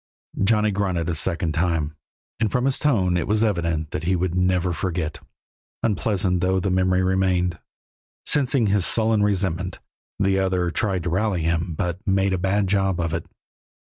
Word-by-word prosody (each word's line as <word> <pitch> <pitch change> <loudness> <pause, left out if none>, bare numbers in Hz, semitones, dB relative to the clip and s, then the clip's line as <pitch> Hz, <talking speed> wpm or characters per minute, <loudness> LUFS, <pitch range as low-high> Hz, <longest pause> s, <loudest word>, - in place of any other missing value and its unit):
Johnny 105 +1 +3
grunted 95 -4 -1
a - - 0
second 85 +1 0
time, 80 -2 0 0.4
and 110 -3 +1
from 125 +4 +1
his 135 -1 +1
tone 100 -12 +2
it 85 - -2
was 105 +1 +2
evident 85 -7 -1
that - - -3
he 95 +2 +2
would 90 -1 -1
never 90 -1 +1
forget, 80 -2 -3 0.6
unpleasant 100 -4 0
though 95 +1 +2
the 95 +1 -1
memory 95 0 +2
remained. 90 -2 +1 0.7
Sensing 135 -4 +2
his 100 -2 +2
sullen 110 +2 +2
resentment, 95 -3 -1 0.4
the 95 -1 +2
other 90 -2 0
tried 95 -2 -1
to 85 - -2
rally 95 -2 0
him, 85 +1 -1
but 90 -1 -2
made 95 0 +2
a 95 - 0
bad 100 +2 +1
job 95 -2 +1
of 85 -1 -1
it. 85 - -3
95 Hz, 170 wpm, -23 LUFS, 85-100 Hz, 0.7 s, Johnny